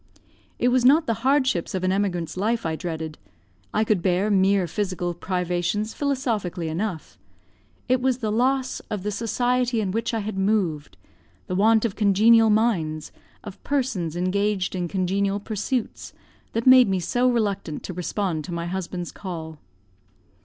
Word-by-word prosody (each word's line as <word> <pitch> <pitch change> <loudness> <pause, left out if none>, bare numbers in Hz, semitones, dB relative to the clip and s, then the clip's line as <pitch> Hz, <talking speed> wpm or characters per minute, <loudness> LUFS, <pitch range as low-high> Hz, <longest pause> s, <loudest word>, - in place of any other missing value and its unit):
It 245 - +2
was 250 0 +2
not 295 +6 +5
the 230 - +1
hardships 260 -10 +1
of 185 - -2
an 185 - +2
emigrant's 185 -4 -1
life 220 +4 -1
I 160 -1 -1
dreaded. 160 -2 -5 0.5
I 215 - +1
could 210 -4 +1
bear 185 +4 +1
mere 195 -1 +3
physical 180 -1 -2
privations 180 +4 -2
philosophically 230 - -2
enough; 170 - -4 0.7
it 255 0 +2
was 260 -1 +1
the 220 -4 -2
loss 260 +3 +1
of 205 -3 -4
the 210 - -2
society 245 +2 0
in 200 -3 -1
which 225 +3 -1
I 225 - -1
had 205 -1 -4
moved, 190 -8 0 0.5
the - - -5
want 220 +4 +4
of 215 - -2
congenial 220 +2 +5
minds, 185 -9 0 0.3
of 205 -2 -10
persons 245 - -1
engaged 190 +2 0
in 180 -2 -2
congenial 195 +2 0
pursuits, 215 +3 -3 0.4
that 230 +1 -1
made 255 -3 +7
me 190 -1 +1
so 245 +8 +1
reluctant 200 -9 -1
to 185 - -6
respond 180 -2 -2
to 180 - -7
my 170 0 -3
husband's 175 -1 -4
call. 160 -5 -7
200 Hz, 155 wpm, -24 LUFS, 180-230 Hz, 0.7 s, made